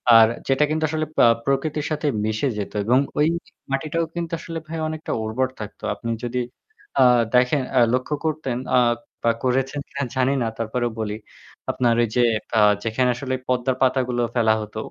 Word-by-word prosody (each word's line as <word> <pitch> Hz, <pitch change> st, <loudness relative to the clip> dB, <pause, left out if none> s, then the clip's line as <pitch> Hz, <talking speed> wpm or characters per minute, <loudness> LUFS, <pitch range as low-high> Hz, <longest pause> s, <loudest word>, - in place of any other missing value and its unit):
আর 115 Hz, -1 st, +9 dB, 0.2 s
যেটা 135 Hz, +2 st, +3 dB
কিন্তু 155 Hz, +1 st, -1 dB
আসলে 155 Hz, 0 st, -1 dB
পা -, -, +7 dB, 0.2 s
প্রকৃতির 150 Hz, +2 st, 0 dB
সাথে 150 Hz, 0 st, -1 dB, 0.2 s
মিশে 110 Hz, +5 st, 0 dB
যেত 100 Hz, -, -4 dB
এবং 125 Hz, +4 st, +4 dB, 0.2 s
ওইযে 165 Hz, +3 st, +1 dB, 0.2 s
মাটিটাও 155 Hz, +4 st, -1 dB
কিন্তু 170 Hz, -1 st, -4 dB
আসলে 165 Hz, 0 st, -5 dB
ভাই 165 Hz, -, -5 dB
অনেকটা 155 Hz, 0 st, -5 dB
উর্বর 115 Hz, +4 st, 0 dB
থাকত। 105 Hz, -1 st, -8 dB
আপনি 115 Hz, -, -6 dB
যদি 120 Hz, +1 st, -2 dB, 0.6 s
আ -, -, +6 dB, 0.3 s
দেখেন 125 Hz, +3 st, +4 dB, 0.2 s
আ -, -, +7 dB
লক্ষ্য 130 Hz, +4 st, 0 dB
করতেন 150 Hz, -6 st, -1 dB, 0.2 s
আ -, -, +6 dB, 0.5 s
বা 115 Hz, -, +4 dB
করেছেন 135 Hz, +3 st, 0 dB
কিনা 140 Hz, 0 st, -4 dB
জানি 130 Hz, +1 st, +2 dB
না। 115 Hz, -, 0 dB
তারপরেও 120 Hz, +1 st, -1 dB
বলি 105 Hz, -1 st, -2 dB, 0.6 s
আপনার 120 Hz, -2 st, +2 dB
ওই 120 Hz, -, +2 dB
যে 125 Hz, -, +4 dB, 0.3 s
কা 115 Hz, -, 0 dB, 0.3 s
যেখানে 125 Hz, +3 st, +1 dB
আসলে 130 Hz, +1 st, -4 dB
পদ্মার 125 Hz, 0 st, +1 dB
পাতাগুলো 125 Hz, -2 st, +2 dB
ফেলা 110 Hz, -2 st, +4 dB
হতো 105 Hz, 0 st, -8 dB
130 Hz, 175 wpm, -23 LUFS, 120-150 Hz, 0.6 s, আর